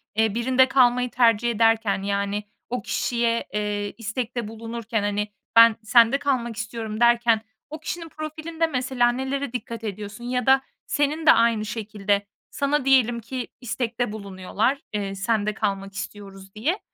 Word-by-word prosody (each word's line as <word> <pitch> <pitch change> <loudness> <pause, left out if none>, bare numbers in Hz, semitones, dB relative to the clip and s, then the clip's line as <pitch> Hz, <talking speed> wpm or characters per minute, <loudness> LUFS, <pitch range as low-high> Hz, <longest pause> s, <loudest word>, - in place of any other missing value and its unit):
eee, 220 -1 +2
birinde 260 +2 +3
kalmayı 250 -2 +3
tercih 235 -1 +3
ederken 225 -3 +2
yani 200 +1 -1 0.3
o 250 0 -2
kişiye, 235 -1 0
eee, 205 -1 -2
istekte 230 0 -3
bulunurken, 225 0 -4
hani, 205 0 -1 0.3
"Ben 230 -1 +8
sende 235 +3 +5
kalmak 245 -5 -1
istiyorum." 220 0 -5
derken 235 -2 +4 0.3
o 310 - -7
kişinin 335 -2 -5
profilinde 315 +2 -3
mesela 255 -3 +1
nelere 265 0 -3
dikkat 230 -2 -5
ediyorsun? 210 +2 -6
Ya 250 0 -1
da 265 0 +5 0.2
senin 300 +2 0
de - - +9
aynı 230 -2 +3
şekilde 205 -2 -2 0.2
sana 280 -1 0
diyelim 245 -3 +4
ki 245 +2 -5
istekte 240 -1 -2
bulunuyorlar, 200 +5 -2 0.2
eee, 200 -1 -2
sende 210 +1 0
kalmak 195 -1 -2
istiyoruz 195 0 -9
diye, 310 - -1
230 Hz, 140 wpm, -24 LUFS, 210-255 Hz, 0.3 s, de